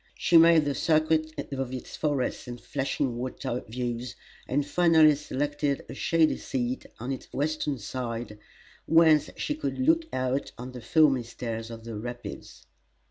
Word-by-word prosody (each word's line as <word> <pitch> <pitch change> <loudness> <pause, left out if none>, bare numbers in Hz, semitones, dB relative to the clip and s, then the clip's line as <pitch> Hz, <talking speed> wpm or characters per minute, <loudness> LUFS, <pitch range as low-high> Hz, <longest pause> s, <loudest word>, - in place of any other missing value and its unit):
She 175 - +1
made 165 -1 +7
the 145 - 0
circuit 155 +2 +2 0.2
of 135 -2 -3
its 130 -1 -7
forests 140 -4 -1
and 120 0 -6
flashing 135 -2 -2
water 125 0 -4
views, 120 +1 -4 0.3
and 140 +2 0
finally 160 -1 +5
selected 145 0 -2
a - - -7
shady 165 -2 +2
seat 125 -1 -3
on 125 +4 -4
its 130 - -6
western 150 -1 -1
side, 115 -1 -5 0.5
whence 160 -2 +5
she 300 - -1
could 305 +1 -3
look 320 +4 +2
out 130 +2 -1
on 125 +2 -7
the 125 -1 -9
foamy 140 +1 +4
stairs 115 -1 -5
of 115 -1 -9
the 115 -1 -6
Rapids. 120 +2 -8
135 Hz, 150 wpm, -27 LUFS, 120-155 Hz, 0.5 s, made